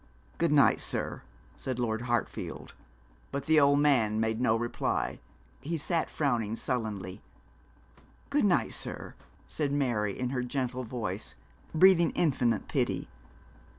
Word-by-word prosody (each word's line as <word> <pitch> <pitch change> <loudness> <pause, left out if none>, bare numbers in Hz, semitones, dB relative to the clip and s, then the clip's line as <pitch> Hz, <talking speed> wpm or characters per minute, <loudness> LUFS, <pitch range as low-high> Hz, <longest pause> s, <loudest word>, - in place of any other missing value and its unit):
'Good - - +2
night, - - +5
sir,' - - -3 0.3
said 130 -2 -4
Lord 115 -2 -1
Hartfield; 120 -2 -2 0.6
but 140 0 -3
the 160 0 +5
old 140 0 +5
man 115 -7 +3
made 110 +1 0
no 115 -3 +3
reply. 120 +1 -1 0.4
He 160 +5 -3
sat 165 +2 -1
frowning 120 -7 0
sullenly. 110 -7 -3 1.1
'Good - - +3
night, - - +2
sir,' - - -6 0.3
said 145 -3 -2
Mary, 120 -8 0
in 125 -1 -1
her 130 -2 -1
gentle 130 0 -2
voice, 110 -4 -4 0.4
breathing 170 -1 +6
infinite 130 -8 +1
pity. - - -1
125 Hz, 125 wpm, -30 LUFS, 110-140 Hz, 1.1 s, breathing